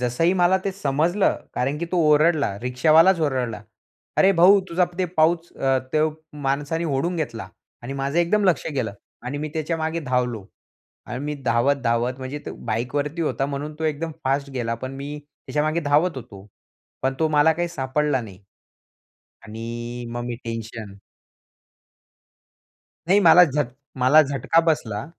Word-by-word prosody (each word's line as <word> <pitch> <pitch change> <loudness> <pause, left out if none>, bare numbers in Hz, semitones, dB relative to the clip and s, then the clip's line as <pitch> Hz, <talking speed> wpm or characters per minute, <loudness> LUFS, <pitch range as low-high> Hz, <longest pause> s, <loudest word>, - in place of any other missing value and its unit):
जसंही 125 +9 +1
मला 180 +1 +3
ते 195 - -1
समजलं 170 +3 +1 0.2
कारण 135 +4 -1
की 170 - -2
तो - - +1
ओरडला. 150 -8 +3
रिक्षावालाच 155 +8 +4
ओरडला 130 -8 -1 0.5
"अरे 195 - +5
भाऊ 190 +3 +6
तुझा 175 +2 +2
ते 185 - +2
पाऊच 165 +2 +2
अ, 135 -1 +1
तो 155 0 +3 0.4
माणसाने 145 +5 -1
ओढून 170 +6 -1
घेतला." 115 -10 -4 0.3
आणि 125 +3 -6
माझं 140 +3 -2
एकदम 200 +5 +2
लक्ष 185 -3 +2
गेलं. 120 -6 -2 0.3
आणि 130 +4 -4
मी 155 +1 -3
त्याच्यामागे 160 +1 -2
धावलो. 125 -6 -1 0.6
आणि 125 - -5
मी 150 0 -2
धावत-धावत 120 0 +1
म्हणजे 130 +2 -5
तो - - -4
बाईकवरती 140 +8 -2
होता, 135 -3 -1
म्हणून 145 +2 -5
तो 160 - -3
एकदम 155 +1 -2
फास्ट 140 +1 0
गेला. 120 -3 -2
पण 130 +3 -7
मी 145 +2 -6
त्याच्यामागे 155 +2 -2
धावत 150 +2 +2
होतो. 100 -6 -10 0.6
पण 135 0 0
तो 160 - +3
मला 155 +1 +4
काही 175 +2 -2
सापडला 145 -2 -1
नाही 100 -4 -11 1.0
आणि 120 +2 -6
मग 120 0 -4
मी 120 -1 -4
टेन्शन 115 -2 -6 2.2
नाही 195 +3 +5
मला 180 -1 +8
झट 150 -3 -1 0.3
मला 130 +5 +6
झटका 140 +3 +1
बसला. 110 -9 -1
145 Hz, 150 wpm, -23 LUFS, 125-160 Hz, 2.2 s, मला